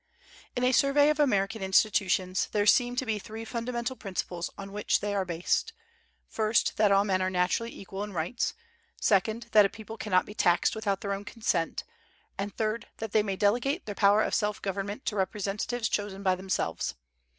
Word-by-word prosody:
In 245 Hz, -, -1 dB
a 250 Hz, -, +4 dB
survey 280 Hz, +3 st, +4 dB
of 305 Hz, -, -3 dB
American 210 Hz, -6 st, +1 dB
Institutions 190 Hz, -1 st, +2 dB
there 205 Hz, -1 st, +1 dB
seem 245 Hz, +3 st, +4 dB
to 260 Hz, -, -1 dB
be 220 Hz, -2 st, -1 dB
three 220 Hz, +3 st, -8 dB
fundamental 235 Hz, +2 st, -3 dB
principles 185 Hz, -5 st, -4 dB
on 195 Hz, 0 st, -8 dB
which 205 Hz, +1 st, +1 dB
they 205 Hz, 0 st, -2 dB
are 195 Hz, -2 st, 0 dB
based: 175 Hz, -, -1 dB, 0.5 s
first, 220 Hz, 0 st, +1 dB
that 210 Hz, -2 st, +4 dB
all 195 Hz, 0 st, +5 dB
men 190 Hz, -2 st, +1 dB
are 185 Hz, -, +1 dB
naturally 185 Hz, +6 st, 0 dB
equal 195 Hz, +1 st, -7 dB
in 210 Hz, -, -6 dB
rights; 180 Hz, -, -2 dB, 0.4 s
second, 220 Hz, +3 st, +1 dB
that 210 Hz, -1 st, +7 dB
a 195 Hz, -, +2 dB
people 220 Hz, +2 st, -9 dB
cannot 185 Hz, -4 st, +1 dB
be 205 Hz, -, -9 dB
taxed 175 Hz, -4 st, +2 dB
without 205 Hz, -3 st, -1 dB
their 200 Hz, -1 st, -2 dB
own 195 Hz, +1 st, -5 dB
consent; 200 Hz, -6 st, -1 dB, 0.5 s
and 200 Hz, 0 st, -5 dB
third, 220 Hz, 0 st, -1 dB
that 225 Hz, -2 st, -5 dB
they 215 Hz, -, +4 dB
may 200 Hz, -2 st, -2 dB
delegate 245 Hz, -, +1 dB
their 205 Hz, -, -4 dB
power 205 Hz, +1 st, +4 dB
of -, -, -2 dB
self 210 Hz, -2 st, 0 dB
government 200 Hz, +4 st, -4 dB
to 210 Hz, -, -1 dB
representatives 205 Hz, +4 st, -1 dB
chosen 200 Hz, -2 st, -3 dB
by 190 Hz, -2 st, +3 dB
themselves. 185 Hz, -, -2 dB
205 Hz, 185 wpm, -28 LUFS, 195-225 Hz, 0.5 s, that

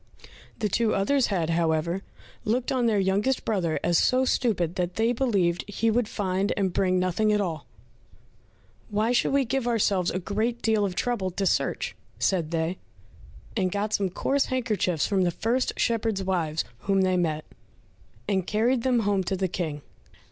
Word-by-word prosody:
The 215 Hz, -, 0 dB
two 225 Hz, +2 st, +1 dB
others 255 Hz, +7 st, +2 dB
had, 170 Hz, -5 st, 0 dB
however, 165 Hz, +2 st, 0 dB, 0.4 s
looked 240 Hz, +4 st, 0 dB
on 250 Hz, -3 st, +2 dB
their 220 Hz, -2 st, +2 dB
youngest 200 Hz, +7 st, +1 dB
brother 180 Hz, -7 st, 0 dB
as 175 Hz, -, +3 dB
so 255 Hz, +1 st, +3 dB
stupid 200 Hz, -11 st, +1 dB
that 180 Hz, -1 st, -2 dB
they 225 Hz, +2 st, +2 dB
believed 200 Hz, -9 st, +1 dB
he 225 Hz, +2 st, +1 dB
would 235 Hz, 0 st, +1 dB
find 195 Hz, -1 st, -1 dB
and 190 Hz, -3 st, 0 dB
bring 185 Hz, 0 st, +2 dB
nothing 185 Hz, +4 st, +1 dB
at 210 Hz, -, +2 dB
all. 165 Hz, -7 st, -3 dB, 1.2 s
"Why 215 Hz, +2 st, +1 dB
should 245 Hz, -, +2 dB
we 275 Hz, -1 st, +2 dB
give 255 Hz, +1 st, -1 dB
ourselves 200 Hz, -6 st, +2 dB
a -, -, -2 dB
great 220 Hz, +6 st, -1 dB
deal 220 Hz, -2 st, +2 dB
of 185 Hz, -2 st, -3 dB
trouble 235 Hz, -6 st, -1 dB
to 195 Hz, +2 st, -2 dB
search?" -, -, 0 dB, 0.2 s
said 175 Hz, -5 st, 0 dB
they, 165 Hz, +2 st, -2 dB, 0.8 s
and 185 Hz, -4 st, +1 dB
got 205 Hz, +2 st, -2 dB
some 195 Hz, -2 st, +1 dB
coarse 275 Hz, +9 st, 0 dB
handkerchiefs 215 Hz, -, 0 dB
from 195 Hz, -2 st, +1 dB
the 180 Hz, -, +3 dB
first 235 Hz, +8 st, 0 dB
shepherds' 225 Hz, -4 st, 0 dB
wives 165 Hz, -4 st, 0 dB, 0.2 s
whom 195 Hz, +5 st, +1 dB
they 185 Hz, -1 st, +2 dB
met, 155 Hz, -3 st, 0 dB, 0.8 s
and 190 Hz, -3 st, 0 dB
carried 235 Hz, +4 st, +2 dB
them 245 Hz, -1 st, +2 dB
home 200 Hz, -2 st, +1 dB
to 190 Hz, -, -1 dB
the 190 Hz, 0 st, 0 dB
King. 155 Hz, -5 st, -4 dB
200 Hz, 170 wpm, -26 LUFS, 180-230 Hz, 1.2 s, as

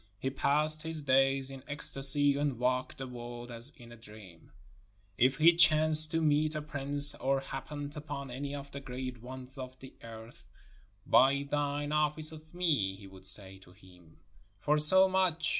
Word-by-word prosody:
He 135 Hz, +5 st, -4 dB
passed 150 Hz, +3 st, +2 dB
his 160 Hz, -1 st, -7 dB
days 135 Hz, 0 st, +1 dB
in 135 Hz, -1 st, -11 dB
ecstasy 140 Hz, 0 st, +3 dB
and 140 Hz, -3 st, -3 dB
walked 125 Hz, +1 st, -2 dB
the 135 Hz, -, -7 dB
world 120 Hz, -1 st, -10 dB
as 120 Hz, +4 st, -2 dB
in 120 Hz, -2 st, -15 dB
a -, -, -12 dB
dream. 105 Hz, -6 st, -16 dB, 0.6 s
If 130 Hz, +5 st, +1 dB
he 165 Hz, +2 st, +4 dB
chanced 155 Hz, -2 st, +6 dB
to 165 Hz, 0 st, -2 dB
meet 155 Hz, +1 st, 0 dB
a 155 Hz, -, -4 dB
prince 145 Hz, -1 st, +4 dB
or 135 Hz, 0 st, -2 dB
happened 145 Hz, +2 st, -8 dB
upon 145 Hz, -3 st, -8 dB
any 140 Hz, +3 st, -6 dB
of 140 Hz, 0 st, -10 dB
the 140 Hz, -, -8 dB
great 130 Hz, -2 st, -8 dB
ones 130 Hz, +2 st, -12 dB
of 130 Hz, 0 st, -9 dB
the 130 Hz, 0 st, -14 dB
earth, 115 Hz, -2 st, -14 dB, 0.6 s
"Buy 140 Hz, +2 st, +2 dB
thine 145 Hz, 0 st, -3 dB
office 150 Hz, +1 st, 0 dB
of 155 Hz, 0 st, -14 dB
me," 150 Hz, -, -2 dB
he 100 Hz, +1 st, -15 dB
would 95 Hz, -1 st, -12 dB
say 95 Hz, 0 st, -5 dB
to 90 Hz, -1 st, -19 dB
him, 90 Hz, -4 st, -21 dB, 0.4 s
"for 150 Hz, +7 st, 0 dB
so 185 Hz, +6 st, +5 dB
much!" 185 Hz, -4 st, -1 dB
135 Hz, 175 wpm, -29 LUFS, 125-150 Hz, 0.6 s, chanced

